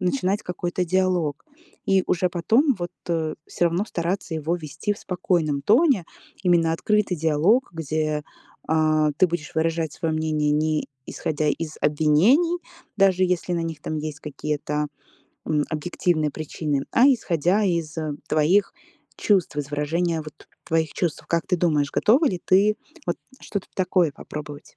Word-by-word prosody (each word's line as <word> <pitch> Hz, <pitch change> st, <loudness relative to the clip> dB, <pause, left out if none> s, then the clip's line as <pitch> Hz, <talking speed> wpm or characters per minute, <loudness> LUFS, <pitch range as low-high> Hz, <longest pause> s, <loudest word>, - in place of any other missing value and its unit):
начинать 195 Hz, +1 st, 0 dB
какой-то 180 Hz, 0 st, -2 dB
диалог. 180 Hz, -5 st, 0 dB, 0.4 s
И 190 Hz, -1 st, +4 dB
уже 180 Hz, +1 st, +1 dB
потом 230 Hz, -, +2 dB
вот, 175 Hz, 0 st, -4 dB, 0.2 s
э, 160 Hz, -2 st, -1 dB
всё 175 Hz, -, +1 dB
равно 175 Hz, +5 st, 0 dB
стараться 175 Hz, -1 st, -2 dB
его 160 Hz, +3 st, -1 dB
вести 160 Hz, +5 st, -3 dB
в 205 Hz, -, -8 dB
спокойном 165 Hz, -6 st, -1 dB
тоне. 240 Hz, -, +4 dB, 0.4 s
Именно 170 Hz, -3 st, +3 dB
открытый 210 Hz, +1 st, +1 dB
диалог, 165 Hz, -, +2 dB
где, 155 Hz, -1 st, -2 dB, 0.5 s
э, 155 Hz, -1 st, +3 dB
ты 185 Hz, -, +6 dB
будешь 160 Hz, -3 st, -4 dB
выражать 160 Hz, -1 st, 0 dB
своё 165 Hz, -2 st, -2 dB
мнение 155 Hz, -1 st, 0 dB
не 155 Hz, 0 st, 0 dB, 0.2 s
исходя 150 Hz, 0 st, -2 dB
из 155 Hz, +1 st, -2 dB
обвинений, 180 Hz, -, +3 dB, 0.4 s
даже 190 Hz, -2 st, +4 dB
если 180 Hz, 0 st, -1 dB
на 170 Hz, -1 st, 0 dB
них 165 Hz, -2 st, -5 dB
там 155 Hz, -, -3 dB
есть 155 Hz, -1 st, -5 dB
какие-то, 150 Hz, 0 st, -3 dB, 0.6 s
м, 150 Hz, -1 st, +1 dB
объективные 155 Hz, 0 st, 0 dB
причины, 150 Hz, -2 st, -3 dB
а 250 Hz, +4 st, +6 dB
исходя 200 Hz, -, +2 dB
из 170 Hz, -4 st, -1 dB, 0.3 s
твоих 175 Hz, +7 st, +3 dB, 0.4 s
чувств, 190 Hz, -7 st, +1 dB
из 145 Hz, -1 st, -2 dB
выражения 160 Hz, +3 st, 0 dB
вот 155 Hz, 0 st, -13 dB, 0.2 s
твоих 160 Hz, -2 st, 0 dB
чувств. 170 Hz, -5 st, -2 dB
Как 170 Hz, 0 st, 0 dB
ты 180 Hz, -, +1 dB
думаешь, 150 Hz, -5 st, +1 dB
готова 270 Hz, +9 st, +4 dB
ли 180 Hz, -6 st, -1 dB
ты, 205 Hz, +3 st, +4 dB, 0.3 s
вот -, -, 0 dB, 0.2 s
что-то 200 Hz, -3 st, -5 dB
такое 180 Hz, -4 st, +2 dB
попробовать? 150 Hz, 0 st, -9 dB
165 Hz, 145 wpm, -24 LUFS, 155-185 Hz, 0.6 s, ты